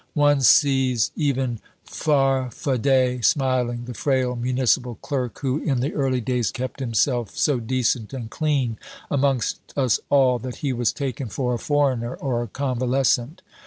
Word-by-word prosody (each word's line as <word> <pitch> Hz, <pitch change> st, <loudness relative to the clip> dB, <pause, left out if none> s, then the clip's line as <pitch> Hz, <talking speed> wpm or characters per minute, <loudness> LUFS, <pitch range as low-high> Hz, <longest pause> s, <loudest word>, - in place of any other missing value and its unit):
One 145 Hz, -2 st, +3 dB
sees 130 Hz, -2 st, +4 dB
even 135 Hz, -6 st, -1 dB, 0.3 s
Farfadet 130 Hz, -2 st, +1 dB
smiling, 125 Hz, -2 st, +1 dB
the 125 Hz, -, -6 dB
frail 130 Hz, -1 st, 0 dB
municipal 125 Hz, 0 st, 0 dB
clerk 130 Hz, -2 st, -4 dB
who 135 Hz, +1 st, 0 dB
in 135 Hz, -6 st, -1 dB
the 135 Hz, +5 st, -1 dB
early 135 Hz, -3 st, 0 dB
days 120 Hz, -1 st, -1 dB
kept 130 Hz, +2 st, -5 dB
himself 120 Hz, -1 st, 0 dB
so 140 Hz, -4 st, +2 dB
decent 120 Hz, -2 st, -1 dB
and 125 Hz, -4 st, -6 dB
clean 135 Hz, -4 st, -1 dB, 0.3 s
amongst 135 Hz, -4 st, +1 dB, 0.2 s
us 130 Hz, -6 st, +2 dB
all 130 Hz, -3 st, +4 dB
that 125 Hz, +1 st, -6 dB
he 135 Hz, -, +1 dB
was 120 Hz, -2 st, +1 dB
taken 135 Hz, -2 st, -4 dB
for 125 Hz, +3 st, -2 dB
a 120 Hz, -, -2 dB
foreigner 130 Hz, -5 st, 0 dB
or 125 Hz, -4 st, -2 dB
a 120 Hz, -, -4 dB
convalescent. 130 Hz, -, 0 dB
130 Hz, 145 wpm, -23 LUFS, 120-135 Hz, 0.3 s, sees